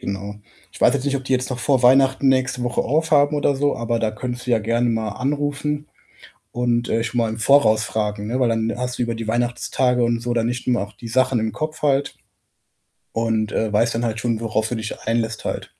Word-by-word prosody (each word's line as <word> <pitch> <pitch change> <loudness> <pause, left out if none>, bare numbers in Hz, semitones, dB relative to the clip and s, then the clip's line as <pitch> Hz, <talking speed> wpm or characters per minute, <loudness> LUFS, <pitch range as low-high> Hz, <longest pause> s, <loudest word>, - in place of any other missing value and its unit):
Genau. 100 +1 -5 0.4
Ich - - -13
weiß - - +5
jetzt 135 -1 -1
nicht, 140 -1 +1
ob 135 - -7
die 130 - -2
jetzt 130 +1 0
noch 125 - -3
vor 130 0 +1
Weihnachten 135 +2 +4
nächste 125 -1 +1
Woche 125 0 0
aufhaben 150 0 +2
oder 145 -1 +2
so, 145 +1 0
aber 115 0 -1
da 110 - +1
könntest 125 +3 -6
du - - -1
ja 115 - +4
gerne 115 +2 0
mal 110 -2 -1
anrufen 145 +4 -2 0.6
und, 120 -1 0
äh, 115 0 0
schon 115 +1 -3
mal 115 -1 +2
im 110 +1 -5
Voraus 110 -3 +4
fragen, 105 -1 -2
ne, 125 +4 -2
weil, 125 - +3
dann 115 0 0
hast 125 0 -4
du - - 0
über 115 -1 -1
die 115 -1 -6
Weihnachtstage 120 +1 0
und 115 0 0
so 120 0 -2
dann 115 -1 +1
nicht 125 +1 -3
immer 125 -5 +2
auch 100 +1 -5
die 110 +4 -10
Sachen 130 +1 +2
im 110 0 -1
Kopf 155 0 -5
halt 140 -1 +1 1.0
und, 110 -2 0
äh, 110 -2 -1
weißt 115 +3 +2
dann 115 +1 -1
halt 110 -2 -2
schon, 115 -2 -1
worauf 110 -1 -1
du 120 - -3
dich 110 0 -5
einlässt 115 -1 -1
halt. - - -3
120 Hz, 230 wpm, -21 LUFS, 110-130 Hz, 1.0 s, weiß